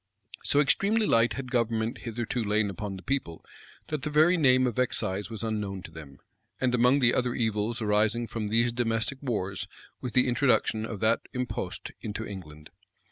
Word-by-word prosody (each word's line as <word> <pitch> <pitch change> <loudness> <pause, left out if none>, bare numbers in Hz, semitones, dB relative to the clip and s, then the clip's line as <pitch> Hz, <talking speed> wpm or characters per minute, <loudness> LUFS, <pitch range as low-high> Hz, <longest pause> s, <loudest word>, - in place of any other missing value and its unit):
So 145 - +3
extremely 205 +9 +3
light 115 - +3
had 130 -2 -6
government 115 -2 0
hitherto 120 +1 -3
lain 105 -1 +1
upon 100 +1 -5
the 95 - -10
people 130 -12 -3 0.4
that 150 -2 -2
the 150 - -2
very 155 +4 +5
name 130 -6 +4
of 125 -1 -1
excise 100 -5 -1
was 115 -1 -6
unknown 105 -4 -3
to - - -10
them; 75 -4 -11 0.4
and 130 -1 +1
among 125 +3 +4
the 125 -1 +4
other 125 -1 0
evils 110 0 -1
arising 110 +3 +2
from 110 -2 -4
these 115 +3 +2
domestic 115 +2 -1
wars 105 -8 -3 0.3
was 125 - -4
the 125 -1 +5
introduction 115 -3 +2
of 105 -4 -6
that 110 +1 +3 0.2
impost 125 -1 -4
into 110 +1 -4
England. 75 -7 -10
115 Hz, 175 wpm, -28 LUFS, 105-125 Hz, 0.4 s, very